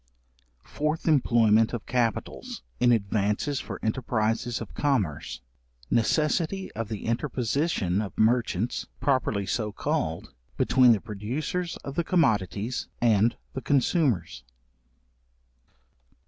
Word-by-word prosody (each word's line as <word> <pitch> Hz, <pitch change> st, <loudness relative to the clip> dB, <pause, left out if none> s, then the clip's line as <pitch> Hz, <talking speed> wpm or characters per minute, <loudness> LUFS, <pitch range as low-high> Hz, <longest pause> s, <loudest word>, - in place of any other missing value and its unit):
Fourth 155 Hz, +2 st, -2 dB
employment 115 Hz, -7 st, +4 dB
of 120 Hz, -, -4 dB
capitals, 115 Hz, -, -2 dB, 0.2 s
in 125 Hz, 0 st, +4 dB
advances 105 Hz, +5 st, 0 dB
for -, -, -6 dB
enterprises 115 Hz, 0 st, 0 dB
of 115 Hz, -, -8 dB
commerce. 105 Hz, -, -1 dB, 0.5 s
Necessity 160 Hz, -, +1 dB
of 115 Hz, -1 st, -5 dB
the 110 Hz, -3 st, -5 dB
interposition 120 Hz, -, 0 dB
of 100 Hz, -4 st, -6 dB
merchants, 115 Hz, -1 st, +1 dB
properly 130 Hz, -7 st, +1 dB
so 105 Hz, +3 st, -1 dB
called, -, -, -2 dB, 0.2 s
between 125 Hz, -2 st, +5 dB
the 105 Hz, -, -1 dB
producers 130 Hz, -, -3 dB
of 140 Hz, -, -5 dB
the 170 Hz, -, 0 dB
commodities 110 Hz, -, 0 dB
and 115 Hz, 0 st, +3 dB, 0.2 s
the 130 Hz, -, -4 dB
consumers. 130 Hz, -, +1 dB
115 Hz, 105 wpm, -27 LUFS, 105-140 Hz, 0.5 s, between